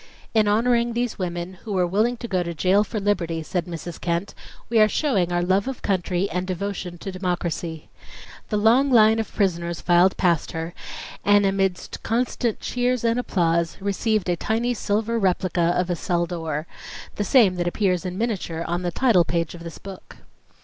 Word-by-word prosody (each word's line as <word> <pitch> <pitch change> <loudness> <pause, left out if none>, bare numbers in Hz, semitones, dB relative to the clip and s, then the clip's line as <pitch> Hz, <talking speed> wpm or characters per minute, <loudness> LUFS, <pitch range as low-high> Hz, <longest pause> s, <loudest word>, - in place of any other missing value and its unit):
"In 215 -2 +3
honoring 235 +2 +2
these 240 -2 -2
women, 175 0 -4
who 215 - -5
were 185 -2 +2
willing 215 +7 +1
to 235 - -6
go 185 -4 0
to 170 -1 -4
jail 190 +6 +3
for 215 0 -4
liberty," 170 -5 -1
said 175 +1 -2
Mrs. 170 0 -7
Kent, 170 +3 -2 0.3
"we 230 -1 +2
are 215 - +7
showing 195 - +1
our 175 0 +1
love 190 +4 +1
of 265 -2 -5
country 185 -1 0
and 180 +2 -2
devotion 185 -1 -4
to 195 +3 -6
democracy." 175 -3 -3 0.6
The 210 - 0
long 235 +7 +4
line 220 -3 +5
of 225 - -3
prisoners 170 -4 -1
filed 175 +2 +3
past 170 -4 +1
her 165 +1 -4 0.5
and 205 0 +4
amidst 195 -2 -1
constant 235 -1 -1
cheers 250 -1 0
and 230 +1 +2
applause, 170 -7 0
received 200 +1 0
a 175 - +2
tiny 230 +7 0
silver 225 +1 -1
replica 180 -3 +1
of 180 0 0
a - - +1
cell 175 0 0
door, 165 -3 -4 0.5
the 205 - 0
same 210 -3 +5
that 175 0 -1
appears 180 -1 0
in 180 -1 -4
miniature 190 -7 -2
on 175 +1 -1
the 175 -1 -2
title 225 -5 +4
page 165 0 -2
of 170 -1 -10
this 165 -1 -8
book. 195 -2 -11
185 Hz, 185 wpm, -23 LUFS, 175-220 Hz, 0.6 s, are